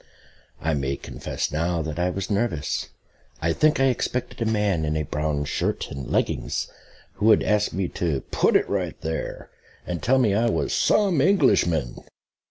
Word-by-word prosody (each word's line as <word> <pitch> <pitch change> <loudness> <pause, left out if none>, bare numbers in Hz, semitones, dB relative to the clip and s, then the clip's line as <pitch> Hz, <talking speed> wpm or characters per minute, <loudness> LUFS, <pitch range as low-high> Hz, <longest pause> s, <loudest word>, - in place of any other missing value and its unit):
I 80 +1 0
may 70 -1 -1
confess - - -4
now 85 +2 0
that 80 +1 -5
I 90 +1 +2
was 100 +3 -4
nervous. 100 -8 -1 0.5
I 80 +1 +1
think 155 - +3
I - - +4
expected 125 -1 -2
a 110 -1 +1
man 105 -6 +1
in 75 0 0
a 75 - 0
brown 75 0 -2
shirt - - -2
and 70 -2 -6
leggings, - - -1 0.4
who 105 - 0
would 110 - +6
ask 105 -1 +1
me 95 -1 -1
to 80 -6 -1
put - - +2
it - - +4
"right - - -2
there," 80 +1 -4 0.3
and 85 -3 -4
tell 130 - +3
me 115 -6 +3
I 115 +3 +2
was - - -1
"some 195 -9 +3
Englishman." 125 - +2
90 Hz, 175 wpm, -24 LUFS, 75-115 Hz, 0.5 s, would